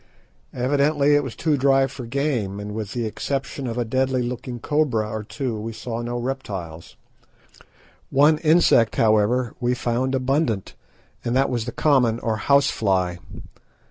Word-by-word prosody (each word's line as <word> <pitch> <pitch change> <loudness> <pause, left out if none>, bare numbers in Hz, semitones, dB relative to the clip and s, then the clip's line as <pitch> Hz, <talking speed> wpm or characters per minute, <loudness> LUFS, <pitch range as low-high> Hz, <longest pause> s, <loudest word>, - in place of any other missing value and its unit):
Evidently 140 +3 +2
it 145 0 +3
was 130 -4 -6
too 155 -3 +1
dry 135 0 +4
for 130 -2 -7
game, 120 -7 -1
and 105 0 -6
with 105 -2 -5
the 120 -2 -2
exception 135 +4 -3
of 115 0 -4
a 120 - 0
deadly 130 +2 0
looking 120 0 -5
cobra 130 -7 0
or 110 0 -4
two 110 +2 -4
we 115 +2 -5
saw 115 +1 -5
no 120 +1 -3
reptiles. 100 -11 -5 1.1
One 150 +3 +4
insect, 155 -8 +4
however, 110 +3 +2
we 125 0 0
found 125 +2 -1
abundant, 130 - 0 0.5
and 120 - -1
that 135 +1 +2
was 120 -3 -1
the 120 - -4
common 125 -5 +2
or 110 -2 -1
house 140 +5 +3
fly. 95 -4 0
125 Hz, 155 wpm, -23 LUFS, 110-135 Hz, 1.1 s, dry